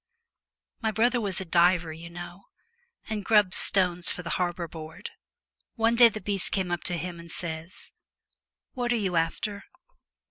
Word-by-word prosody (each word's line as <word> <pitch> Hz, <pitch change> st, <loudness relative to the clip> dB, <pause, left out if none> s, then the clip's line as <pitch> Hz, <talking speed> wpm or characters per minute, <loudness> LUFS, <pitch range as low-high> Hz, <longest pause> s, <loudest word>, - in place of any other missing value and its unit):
My 220 Hz, -, +1 dB
brother 240 Hz, +3 st, +2 dB
was 195 Hz, -4 st, 0 dB
a 190 Hz, -, -4 dB
diver, 175 Hz, -1 st, +3 dB
you 165 Hz, +2 st, -9 dB
know, 175 Hz, +2 st, -9 dB, 0.6 s
and 215 Hz, -2 st, -3 dB
grubbed 205 Hz, -3 st, +4 dB
stones 180 Hz, -3 st, +2 dB
for 180 Hz, -, -5 dB
the 165 Hz, -, -4 dB
Harbour 175 Hz, -1 st, -1 dB
Board. 160 Hz, 0 st, -9 dB, 0.6 s
One 230 Hz, +1 st, +2 dB
day 235 Hz, 0 st, +8 dB
the 215 Hz, -, -6 dB
beast 200 Hz, -3 st, -1 dB
comes 185 Hz, -3 st, -1 dB
up 175 Hz, -2 st, -2 dB
to 175 Hz, -2 st, -1 dB
him, 175 Hz, 0 st, -5 dB
and 170 Hz, 0 st, -11 dB
says, 165 Hz, +1 st, -6 dB, 0.4 s
" -, -, -54 dB
What 245 Hz, -1 st, -1 dB
are -, -, +3 dB
you 195 Hz, -6 st, -1 dB
after 185 Hz, +5 st, -1 dB
180 Hz, 170 wpm, -27 LUFS, 170-210 Hz, 0.6 s, day